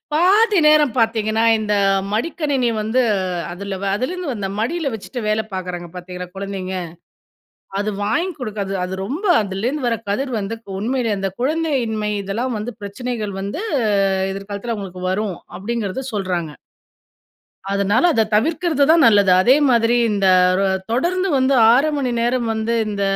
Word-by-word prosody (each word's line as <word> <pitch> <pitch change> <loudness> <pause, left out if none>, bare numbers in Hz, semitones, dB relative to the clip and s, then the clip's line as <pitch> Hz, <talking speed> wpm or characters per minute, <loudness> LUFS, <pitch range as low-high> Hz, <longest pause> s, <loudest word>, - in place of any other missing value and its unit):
பாதி 395 +5 +4
நேரம் 300 -4 +5
பாத்தீங்கன்னா, 225 0 +1
இந்த 210 -1 -1 0.4
மடிக்கணினி 275 0 0
வந்து 220 +4 +1 0.5
அதுல 195 +1 -5
வ - - -1
அதுலருந்து 315 +4 -3
வந்த 200 -4 -4
மடியில 280 +6 -1
வெச்சுட்டு 240 +4 -6
வேல 215 +1 +1
பாக்குறாங்க 180 -2 -5
பார்த்தீங்களா 180 0 -7
குழந்தைங்க. 195 -1 -5 1.1
அது 215 - -1
வாங்கி 340 - 0
குடுக்க 215 -5 -4 0.2
அது 185 +1 -4
ரொம்ப 310 - -4 0.2
அதிலிருந்து 235 +8 -2
வர 230 - +1 0.2
கதிர் 260 +5 -1
வந்து, 205 +3 -4 0.2
உண்மையிலேயே 230 -2 0
அந்த 195 0 -2
குழந்தையின்மை 255 -8 0
இதெல்லாம் 230 +6 -2
வந்து 220 +4 -4
பிரச்சனைகள் 210 0 -4
வந்து 200 - -4 0.7
எதிர்காலத்துல 200 +4 -5
அவங்களுக்கு 185 -3 -7
வரும் 195 -1 -1 0.2
அப்படிங்கிறத 230 +3 -3
சொல்றாங்க. 180 -6 -2 1.2
அதனால 200 - +2
அத 225 - +3
தவிர்க்கிறது 310 +4 +2
தான் 330 0 +6
நல்லது. 205 -4 +5
அதேமாதிரி 240 -1 +4
இந்த 200 -2 +1 0.3
ரொ 195 - +2 0.3
தொடர்ந்து 365 +9 0
வந்து 265 +1 +2 0.2
6:00 275 +5 +4
மணி 260 -3 -1
நேரம் 240 0 0
வந்து 220 +1 -1
இந்த 200 -1 -3
225 Hz, 135 wpm, -20 LUFS, 200-270 Hz, 1.2 s, தான்